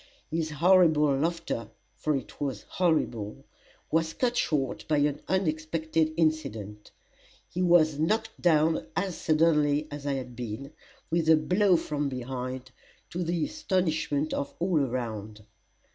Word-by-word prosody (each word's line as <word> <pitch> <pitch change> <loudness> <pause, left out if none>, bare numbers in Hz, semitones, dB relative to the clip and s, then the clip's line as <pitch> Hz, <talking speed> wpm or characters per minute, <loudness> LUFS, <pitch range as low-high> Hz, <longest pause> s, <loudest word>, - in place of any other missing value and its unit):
His 160 0 -1
horrible 155 -3 +4
laughter 160 -7 -2 0.3
for 155 -1 0
it 135 +1 -6
was 135 -7 -2
horrible 150 - -1 0.5
was 165 0 +1
cut 245 -1 0
short 140 - 0
by 155 - +2
an 145 0 +1
unexpected 160 -3 0
incident. 115 -11 -1 0.6
He 180 - -4
was 160 -4 +4
knocked 220 +7 0
down 160 -5 +3
as 190 -3 -1
suddenly 150 -2 +2
as 145 0 -6
I 140 - +1
had 125 -2 -5
been, 125 +4 -6 0.4
with 165 -1 +1
a 160 - +7
blow 180 +4 +3
from 145 -2 -2
behind, 130 0 -5 0.4
to 175 +1 -2
the 170 -1 0
astonishment 160 - -1
of 140 - -3
all 175 -2 +2
around. 110 -4 -4
155 Hz, 130 wpm, -28 LUFS, 135-170 Hz, 0.6 s, a